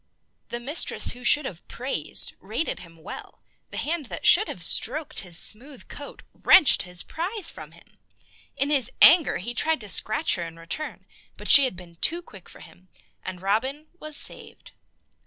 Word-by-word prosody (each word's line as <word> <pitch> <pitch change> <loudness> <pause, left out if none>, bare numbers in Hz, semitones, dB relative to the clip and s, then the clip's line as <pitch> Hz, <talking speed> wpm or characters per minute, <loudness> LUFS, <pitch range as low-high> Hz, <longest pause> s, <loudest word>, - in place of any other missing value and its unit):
The 240 - -5
mistress 285 +7 0
who 245 0 -12
should 295 +4 +4
have 180 -9 -9
praised 255 +3 +1
rated 325 - -4
him 165 -2 -15
well, - - -11 0.3
the - - -8
hand 310 -3 -3
that - - -8
should 420 +5 +6
have 175 - -5
stroked 285 - +1
his 175 -3 -5
smooth 255 +8 -1
coat 285 - -10
wrenched 310 - +5
his 180 -1 -3
prize 370 +3 -4
from - - -12
him. - - -20 0.6
In 280 +2 0
his 270 -6 +1
anger 325 -1 +6
he 235 +7 -6
tried 320 +5 0
to 210 - -7
scratch 215 - +2
her 175 - -4
in 165 0 -9
return, 165 - -7 0.3
but - - 0
she 280 - +9
had 255 - -4
been 170 -1 -14
too 340 - +1
quick 195 - -15
for - - -15
him, 185 +1 -18 0.3
and 185 -1 -8
Robin 260 +10 -2
was 305 -1 -3
saved. - - -5
255 Hz, 175 wpm, -24 LUFS, 185-305 Hz, 0.6 s, she